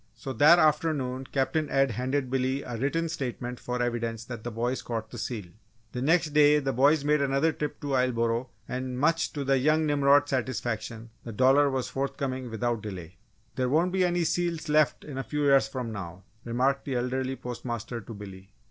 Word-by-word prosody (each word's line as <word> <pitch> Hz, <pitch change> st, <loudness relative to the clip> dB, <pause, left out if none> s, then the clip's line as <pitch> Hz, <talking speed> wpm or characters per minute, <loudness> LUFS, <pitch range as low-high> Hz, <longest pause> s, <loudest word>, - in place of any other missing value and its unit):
So 130 Hz, +3 st, -6 dB
that 150 Hz, +8 st, +7 dB
afternoon 150 Hz, -5 st, +1 dB
Captain 145 Hz, +2 st, 0 dB
Ed 135 Hz, -2 st, +2 dB
handed 130 Hz, +3 st, -2 dB
Billy 130 Hz, +1 st, 0 dB
a 120 Hz, -, -6 dB
written 145 Hz, +8 st, 0 dB
statement 125 Hz, -5 st, -4 dB
for 125 Hz, 0 st, -4 dB
evidence 115 Hz, -1 st, -2 dB
that 120 Hz, -3 st, -7 dB
the 120 Hz, -, -3 dB
boy 120 Hz, +3 st, -1 dB
caught 110 Hz, -2 st, -5 dB
the 120 Hz, -, -7 dB
seal. 110 Hz, -3 st, -4 dB, 0.5 s
The 125 Hz, -, -4 dB
next 160 Hz, +3 st, +3 dB
day 150 Hz, 0 st, +6 dB
the 135 Hz, -2 st, -1 dB
boys 140 Hz, +4 st, +4 dB
made 150 Hz, 0 st, +3 dB
another 140 Hz, +3 st, +2 dB
trip 150 Hz, -1 st, -4 dB
to 145 Hz, -1 st, -3 dB
Islesboro 120 Hz, -1 st, +1 dB, 0.2 s
and 125 Hz, 0 st, -4 dB
much 165 Hz, +4 st, +1 dB
to 145 Hz, -, -3 dB
the 135 Hz, 0 st, +2 dB
young 155 Hz, +4 st, +3 dB
Nimrod's 145 Hz, 0 st, +3 dB
satisfaction 115 Hz, -3 st, -3 dB
the 115 Hz, -, -7 dB
dollar 135 Hz, +6 st, +4 dB
was 130 Hz, -2 st, -2 dB
forthcoming 135 Hz, -2 st, -3 dB
without 115 Hz, 0 st, -1 dB
delay. 95 Hz, -3 st, -8 dB, 0.4 s
"There 130 Hz, -1 st, 0 dB
won't 165 Hz, +6 st, +2 dB
be 185 Hz, 0 st, +2 dB
any 175 Hz, -1 st, +1 dB
seals 170 Hz, -1 st, -1 dB
left 150 Hz, -1 st, +2 dB
a 135 Hz, -3 st, -4 dB
few 145 Hz, +4 st, -3 dB
years 140 Hz, -1 st, +5 dB
from 125 Hz, -4 st, -5 dB
now," 95 Hz, -3 st, -7 dB, 0.2 s
remarked 130 Hz, +4 st, 0 dB
the 135 Hz, -, -2 dB
elderly 130 Hz, +2 st, -1 dB
postmaster 120 Hz, -1 st, -5 dB
to 115 Hz, -, -9 dB
Billy. 95 Hz, -2 st, -10 dB
130 Hz, 185 wpm, -27 LUFS, 120-145 Hz, 0.5 s, that